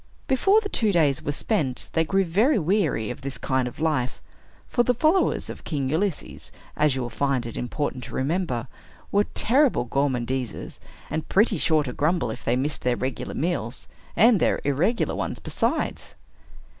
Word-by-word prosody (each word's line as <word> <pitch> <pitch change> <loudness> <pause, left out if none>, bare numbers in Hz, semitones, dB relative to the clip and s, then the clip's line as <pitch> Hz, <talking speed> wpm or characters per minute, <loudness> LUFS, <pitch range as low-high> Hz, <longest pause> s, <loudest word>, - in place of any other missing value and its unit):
Before 385 - +4
the 415 - -3
two 220 - +1
days 150 -7 +2
were 145 - -2
spent, 145 - -1
they 160 - +3
grew 195 +4 +1
very 220 - +3
weary 165 - +1
of 125 - -8
this 135 0 -5
kind 130 -1 0
of 125 - -9
life; 150 -6 0 0.5
for 240 - +2
the 245 +1 +2
followers 320 +9 +2
of - - -8
King 140 -5 -2
Ulysses, 170 +4 -2 0.2
as 150 -3 +2
you 130 - -2
will 120 - -5
find 135 0 0
it 115 - -6
important 130 0 -3
to - - -8
remember, 140 -4 -1 0.4
were 205 +1 +3
terrible 260 - +3
gormandizers, 130 -2 -2 0.3
and 160 - -3
pretty 205 -1 +3
sure 155 -1 +3
to 125 -3 -5
grumble 150 -5 +1
if - - -8
they 120 - +1
missed 140 +4 -1
their 125 -1 +1
regulars 130 +1 -4
meals, 145 -7 -1 0.3
and 225 -2 +6
their - - +2
irregular 165 - +1
ones - - -3
besides. - - -2
150 Hz, 170 wpm, -25 LUFS, 130-200 Hz, 0.5 s, and